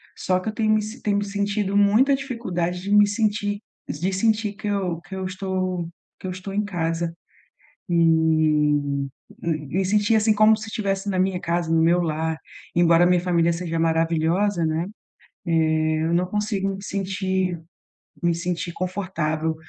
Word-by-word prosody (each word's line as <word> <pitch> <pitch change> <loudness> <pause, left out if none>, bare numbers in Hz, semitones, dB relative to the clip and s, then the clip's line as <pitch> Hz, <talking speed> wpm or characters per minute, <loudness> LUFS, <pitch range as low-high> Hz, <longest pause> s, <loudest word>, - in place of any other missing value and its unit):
Só 185 -1 0
que 185 - -4
eu - - -5
tenho 215 0 +2
me 215 - +2 0.2
tenho 205 -1 +1
me 205 - -1
sentido 200 0 -1
muita 215 +8 +4
dificuldade 185 -10 -3
de 200 +2 -4
me 205 0 +7
sentir 205 -1 0 0.3
de 185 +3 -2
sentir 215 +1 +1
que 210 +1 -7
eu 190 -5 -1
que 175 +4 -9
eu 190 0 -4
estou 185 -2 -2 0.3
que - - -6
eu - - -3
estou 185 +2 -7
em 205 +1 +1
casa 165 -3 -2 0.8
e - - -1
m 155 -4 +2 0.3
me 160 +3 -1
sentir, 210 +3 +2
assim, 215 0 +4
como 215 +1 +5
se 220 +1 -7
tivesse 195 -2 -2
na 185 -2 0
minha 185 -1 +1
casa, 170 -1 -1
no 165 - +4
meu 170 +2 +4
lar, 160 -1 -1 0.4
embora 170 0 +5
a - - +5
minha 180 0 +4
família 170 -2 +2
seja 165 -1 -3
maravilhosa, 165 +3 +1
né, 160 +2 0 0.6
eh, 155 -1 +2
eu 165 +1 +1
não 180 +1 +2
consigo 205 0 -1
me 195 - -10
sentir 190 -2 -2 0.6
me 170 0 +3
sentir 170 0 -3
confortável 170 -4 -2
185 Hz, 170 wpm, -23 LUFS, 165-205 Hz, 0.8 s, me